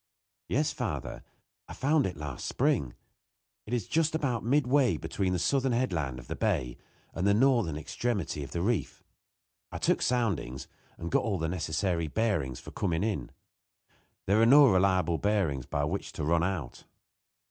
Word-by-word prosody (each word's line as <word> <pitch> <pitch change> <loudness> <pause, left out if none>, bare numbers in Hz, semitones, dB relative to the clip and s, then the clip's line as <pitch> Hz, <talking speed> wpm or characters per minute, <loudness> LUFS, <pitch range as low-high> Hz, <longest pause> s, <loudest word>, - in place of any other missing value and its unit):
"Yes, 145 +4 +1
father, - - -4 0.5
I - - -8
found 145 -1 +2
it 90 - -6
last 75 -4 -5
spring. 65 -4 0 0.7
It - - -8
is 115 -6 -3
just 160 0 +1
about 135 -7 -1
midway 130 - +3
between 95 +4 -2
the 90 - +1
southern 135 +6 +1
headland 80 - -1
of 60 - -10
the - - -4
bay - - -1 0.3
and 90 +4 -1
the 100 - +4
northern 115 - +3
extremity 100 -2 -2
of 70 - -8
the 85 +4 -3
reef. 115 0 -1 0.7
I - - -5
took - - +1
soundings, 95 - -1 0.3
and 85 0 -6
got - - +3
all 105 -4 -1
the 80 -1 -1
necessary 85 0 -1
bearings 80 - -1
for - - -11
coming 85 -2 -1
in. 100 - -2 1.0
There 105 +3 +3
are 115 - +5
no 145 +3 +8
reliable 95 -3 +2
bearings 95 -11 0
by 70 - -1
which 85 +7 -3
to 80 - -4
run 85 +2 +2
out." 85 -8 -3
95 Hz, 165 wpm, -29 LUFS, 80-120 Hz, 1.0 s, no